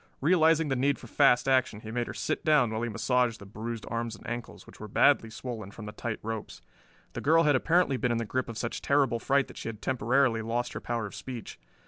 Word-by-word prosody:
Realizing 160 0 +3
the 135 - +1
need 135 +2 +1
for - - -12
fast 135 +1 +3
action 130 -5 +2
he 110 - -8
made 120 +1 -2
her - - -5
sit - - -2
down 145 -7 +4
while 110 0 -2
he 120 - -1
massaged 120 +1 +1
the 100 - -12
bruised 110 +2 -6
arms 115 -1 -3
and 105 - -16
ankles, 120 -5 -6
which - - -15
were 110 - -7
badly 115 +2 +3
swollen 115 -3 -6
from 105 +1 -10
the 105 - -6
tight 110 +1 -4
ropes. 110 -1 -6 0.5
The - - -5
girl 165 +3 +4
had 150 -2 +4
apparently 165 0 +2
been 125 -1 0
in 120 - +1
the 115 - -2
grip 125 +3 -2
of 115 - -6
such 120 - -3
terrible 140 -4 +2
fright 140 +2 +2
that - - -13
she - - -5
had 110 -2 -8
temporarily 125 -1 +1
lost 120 +2 -2
her - - -5
power 115 -2 -2
of 100 - -8
speech. 125 -4 -8
120 Hz, 245 wpm, -29 LUFS, 115-135 Hz, 0.5 s, down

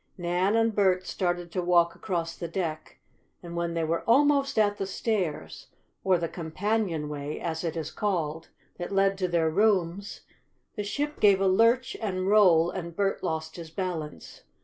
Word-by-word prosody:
Nan 180 +3 +1
and 225 0 +2
Bert 185 -3 +2
started 175 -2 -2
to 180 - -1
walk 175 -1 +3
across 170 -4 -3
the 170 - -5
deck, 165 -3 -4 0.5
and 170 0 -8
when 170 0 -2
they 165 - 0
were 165 +1 0
almost 280 +1 +3
at 205 -1 +3
the 195 - -3
stairs, 195 -6 -3 0.4
or 190 -2 +3
the 170 0 -2
"companionway" 160 -5 -2
as 160 -1 -4
it 165 -1 -3
is 160 -2 -4
called, 165 -6 -2 0.3
that 175 - -5
led 195 0 +3
to 185 - +1
their 165 -2 +1
rooms, 200 0 +1 0.5
the 210 - -3
ship 290 +8 -3
gave 200 -2 +5
a 195 - +2
lurch 230 +6 +3
and 185 -4 -2
roll, 175 -5 +5
and 170 -3 -6
Bert 195 0 0
lost 160 0 -3
his 165 -2 -8
balance. 165 -3 -5
180 Hz, 170 wpm, -27 LUFS, 165-205 Hz, 0.5 s, gave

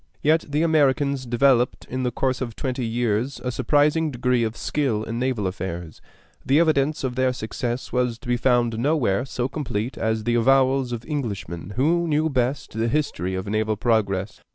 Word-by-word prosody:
Yet 160 +2 +3
the 150 +3 +1
Americans 140 -4 +2
developed, 125 +1 +2
in 130 +1 -3
the 125 - +1
course 130 +2 -1
of 120 -4 -4
twenty 130 -2 -3
years, 120 +2 -1
a 125 - -1
surprising 150 +5 +2
degree 125 -2 +1
of 110 0 -3
skill 130 -8 -1
in 115 +1 -4
naval 125 -5 -1
affairs. 90 -3 -5 0.4
The 140 +3 +3
evidence 155 -3 +2
of 130 -2 -1
their 130 +1 +1
success 120 +1 -4
was 125 -2 0
to 115 - -14
be 120 - +2
found 120 -2 +1
nowhere 130 -5 +1
so 125 -2 -2
complete 125 -5 -4
as 110 0 0
in - - -10
the 120 +2 0
avowals 130 +1 +3
of 120 -1 -5
Englishmen 100 - -4
who 170 +7 +2
knew 155 +1 +1
best 130 +1 -1
the 110 +1 0
history 115 - -1
of 95 - -3
naval 110 +1 0
progress. 100 -4 0
125 Hz, 180 wpm, -23 LUFS, 110-140 Hz, 0.4 s, Yet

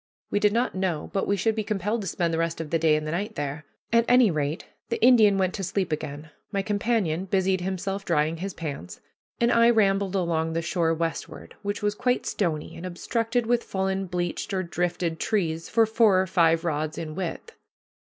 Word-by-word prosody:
We 205 - +2
did 210 0 +3
not 235 +4 0
know 185 -5 -2
but 195 - 0
we 200 - +1
should 220 +4 +1
be 215 0 -2
compelled 210 +2 -1
to 195 - -5
spend 170 -1 -1
the 165 - 0
rest 165 0 -1
of 160 -2 -5
the 165 - +2
day 160 -1 +4
and 155 0 -2
the 155 - -3
night 205 +6 -3
there. 145 +1 -4 0.3
At 230 0 +5
any 245 -4 +5
rate, 150 0 -2 0.2
the 230 - -1
Indian 220 -5 +6
went 185 -1 +1
to 195 - -4
sleep 190 -1 -1
again, 150 0 -5 0.2
my 200 -2 -1
companion 205 -4 0
busied 190 -1 +1
himself 195 +2 -3
drying 160 -2 +1
his 190 +3 -5
plants, 145 - -6 0.4
and 235 0 +3
I 230 0 +5
rambled 200 -4 +2
along 165 -3 0
the 165 0 -1
shore 165 -1 +1
westward, 165 -1 -4
which 205 0 -3
was 205 0 +1
quite 250 +3 0
stony, 160 -6 -2
and 165 - -9
obstructed 230 +6 -1
with 240 +1 +1
fallen 190 0 -2
bleached 175 +2 -3
or 185 - 0
drifted 170 -1 -2
trees 165 -6 -1
for 225 0 +4
four 220 -3 +4
or 190 - +2
five 165 -2 +3
rods 155 -1 -2
in 155 -1 -5
width. 190 - -5
185 Hz, 205 wpm, -26 LUFS, 165-210 Hz, 0.4 s, Indian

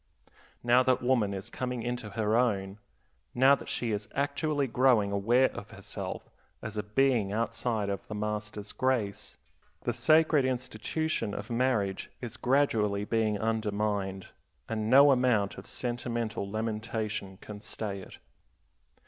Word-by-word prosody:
Now 120 +1 +5
that 130 -1 +2
woman 120 -5 +2
is 95 -1 -5
coming 125 -2 -3
into 120 -2 -3
her 110 0 +2
own, 100 -5 +1 0.6
now 130 +3 +6
that 140 - -2
she 120 -2 -2
is 105 0 -3
actually 145 +1 0
growing 120 -5 +3
aware 120 +6 +3
of 105 -3 -8
herself - - -7 0.3
as 110 0 -7
a 105 - 0
being 110 -1 +2
outside 115 -1 -1
of 100 -1 -4
the 110 - -5
master's 105 0 -4
grace, 120 -6 -1 0.4
the - - -1
sacred 155 -2 +4
institution 130 0 -2
of 105 +4 -6
marriage 115 -6 0
is 120 -3 -6
gradually 110 -7 +1
being 110 -2 +1
undermined, 105 -3 -1 0.4
and 110 -1 -2
no 140 +3 +8
amount 125 -6 +2
of - - -11
sentimental 120 -4 -3
lamentation 110 -2 -3
can 105 +1 -10
stay 105 -2 -4
it. - - -12
110 Hz, 135 wpm, -29 LUFS, 105-125 Hz, 0.6 s, no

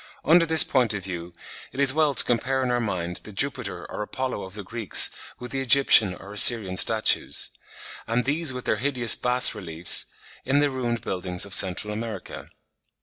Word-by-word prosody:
Under 165 +1 +3
this 160 0 +7
point 125 -6 0
of 95 - -7
view 90 -2 -7 0.4
it 135 - -10
is 140 -2 +4
well 150 -2 0
to - - +8
compare 130 +3 -2
in 125 - -2
our 120 - -1
mind 90 -6 -4
the 105 - -13
Jupiter 125 -2 -2
or - - -8
Apollo 130 +1 -5
of 95 - -13
the 105 - -7
Greeks 110 +1 +2 0.3
with 125 -1 -10
the 135 - -4
Egyptian 125 -7 +4
or 100 +3 -13
Assyrian 105 -3 +5
statues; 110 +3 0 0.6
and 115 +2 -2
these 150 +2 0
with 125 -1 -9
the - - -1
hideous 125 -4 +2
bas 125 0 +1
reliefs 90 -5 -1 0.4
on 135 - +2
the 145 -1 +1
ruined 120 -3 -4
buildings 90 -4 -2
of 100 - -6
Central 95 +4 +1
America. 110 -3 -8
115 Hz, 185 wpm, -23 LUFS, 100-130 Hz, 0.6 s, to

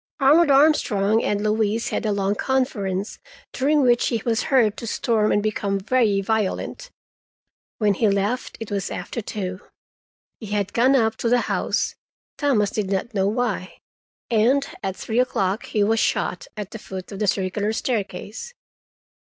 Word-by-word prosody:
Arnold 300 +4 +5
Armstrong 240 -7 +3
and 205 0 0
Louise 215 +1 0
had - - -2
a - - +1
long 200 0 0
conference, 205 -6 -1 0.3
during 290 +2 +2
which 240 -1 +3
he 230 - 0
was 230 -1 0
heard 230 -6 +3
to 230 - -6
storm 220 -2 +1
and 205 - +2
become 200 -2 -1
very 215 -1 +2
violent. 220 - -2 0.9
When 210 -2 +2
he 215 +2 +2
left 200 +5 -1
it 225 -2 -7
was 200 -2 -2
after 180 +6 -5
two. 190 -3 -5 0.8
He 220 - -8
had 205 -1 -2
gone 255 +4 +4
up 225 -3 +2
to 230 - -1
the 245 0 +3
house—Thomas 235 -9 -1
did 205 -3 -2
not 200 +5 -2
know 195 -1 +1
why—and 230 +3 -1
at 190 -1 -3
three 225 +4 -2
o'clock 200 -5 0
he 210 - +1
was 225 +2 +2
shot 180 - -1
at 210 -1 -5
the 225 - -7
foot 190 -1 -8
of 195 - -7
the 210 - 0
circular 195 +3 0
staircase. 225 - -4
215 Hz, 155 wpm, -23 LUFS, 200-245 Hz, 0.9 s, Arnold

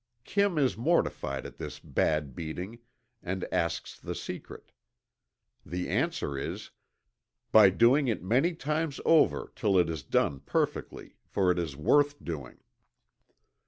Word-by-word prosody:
'" 120 0 -49
Kim 200 +3 +1
is 135 -4 +2
mortified 70 - 0
at - - -10
his - - -6
bad 75 -4 0
beating, 90 +8 -6 0.4
and 95 +1 -3
asks 85 -1 -2
the - - -5
secret. - - -8 0.9
The 90 +3 -4
answer 70 - -1
is: - - -5 0.8
"By 105 -3 +8
doing 120 +9 +4
it 110 -6 -1
many 135 - +2
times 155 -1 -2
over, 160 -2 +3
till 100 -4 +2
it 85 -2 +3
is 80 -3 -4
done 70 +2 0
perfectly, 70 - -3
for 95 -2 +2
it 90 - 0
is 80 -5 -3
worth 145 - +3
doing." 75 -7 -6
95 Hz, 135 wpm, -29 LUFS, -, 0.9 s, By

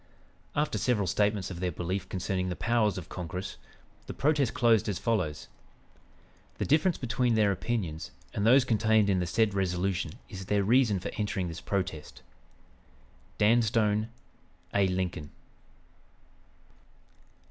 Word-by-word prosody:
[After 150 +1 0
several 115 -6 +1
statements 100 +1 0
of 85 - -6
their 90 -1 -1
belief 90 +3 -4
concerning 95 0 -2
the 90 - -3
powers 110 -3 +1
of 90 -3 -6
Congress, 90 +1 -6 0.5
the - - -6
protest 145 -4 +2
closed 115 -3 +3
as 100 - -1
follows:] 90 -11 -1 1.1
"The - - -1
difference 160 +4 +3
between 125 -1 0
their 105 -2 +3
opinions 90 -6 -3 0.2
and 100 - -2
those 125 +4 +6
contained 110 -3 +3
in 95 - +2
the 90 - -1
said 110 +3 +2
resolution 90 -3 -1
is 95 -4 -8
their 105 -1 +2
reason 115 -2 +3
for - - -5
entering 100 -4 -1
this 80 0 -7
protest. 95 -6 -4 1.1
"DAN 115 +3 +4
STONE, 110 -1 +1 0.6
"A. 100 -1 +3
LINCOLN." 90 -5 -2
100 Hz, 135 wpm, -29 LUFS, 90-115 Hz, 1.1 s, those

